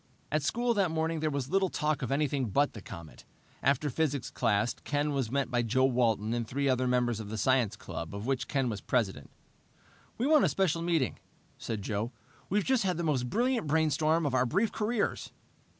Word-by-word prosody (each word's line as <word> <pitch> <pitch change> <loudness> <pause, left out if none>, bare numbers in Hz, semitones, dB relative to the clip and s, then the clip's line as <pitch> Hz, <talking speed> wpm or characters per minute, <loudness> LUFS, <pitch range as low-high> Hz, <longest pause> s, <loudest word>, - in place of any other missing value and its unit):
At 155 +1 +1
school 235 - +1
that 200 -5 +2
morning 160 0 -1
there 155 0 0
was 140 -1 -3
little 195 0 +2
talk 150 -2 -1
of 125 - -3
anything 140 -3 0
but 140 +8 +2
the 105 - -8
comet. 85 -4 -10 0.4
After 140 +2 +2
physics 145 -2 -1
class, 115 -1 +1
Ken 145 +1 0
was 135 -5 -1
met 135 0 -1
by 120 -1 +2
Joe 125 +3 +2
Walton 115 -4 +1
and 120 -1 -2
three 140 +4 -1
other 130 -1 +2
members 125 -2 +1
of 105 -2 -6
the 110 - -4
science 120 -2 +2
club, 85 -3 -7
of 100 +2 -5
which 130 -3 -1
Ken 135 -3 0
was 105 -4 -3
president. 95 - -1 0.9
"We 240 - 0
want 300 0 +5
a - - +4
special 170 -4 +1
meeting," 165 -6 0 0.4
said 110 -3 -4
Joe. 105 +4 -2 0.4
"We've 205 +1 +1
just 260 -3 +2
had 185 -4 0
the 170 - -2
most 130 -6 0
brilliant 240 - +1
brainstorm 160 +1 +2
of 140 - 0
our 130 -1 +3
brief 200 - +1
careers." 215 0 -1
140 Hz, 200 wpm, -30 LUFS, 120-160 Hz, 0.9 s, want